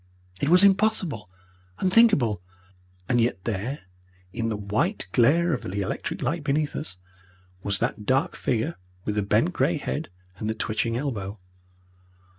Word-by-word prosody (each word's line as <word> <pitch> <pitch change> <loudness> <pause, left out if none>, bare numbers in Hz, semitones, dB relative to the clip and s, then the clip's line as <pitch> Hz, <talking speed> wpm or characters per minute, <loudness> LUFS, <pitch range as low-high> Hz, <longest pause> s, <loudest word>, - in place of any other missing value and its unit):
It 140 - +1
was 180 +3 +6
impossible, 195 - +2 0.5
unthinkable 185 - +4 0.7
and 120 - +3
yet 115 -5 0
there, 115 +6 -3 0.5
in 115 -1 -1
the 110 - -2
white 110 - -1
glare 160 +8 +4
of 125 - -2
the 100 +2 -3
electric 95 - -3
light 150 +5 -1
beneath 150 +1 0
us, 125 -11 -4 0.6
was 100 0 0
that 105 - -2
dark 135 +1 +2
figure 125 +7 -1 0.3
with 105 - 0
the 105 - +1
bent 100 -1 +2
grey - - +2
head, 65 - -3 0.3
and 105 - -2
the 110 - -1
twitching 115 +2 -1
elbow. 110 -7 -3
120 Hz, 145 wpm, -26 LUFS, 105-155 Hz, 0.7 s, was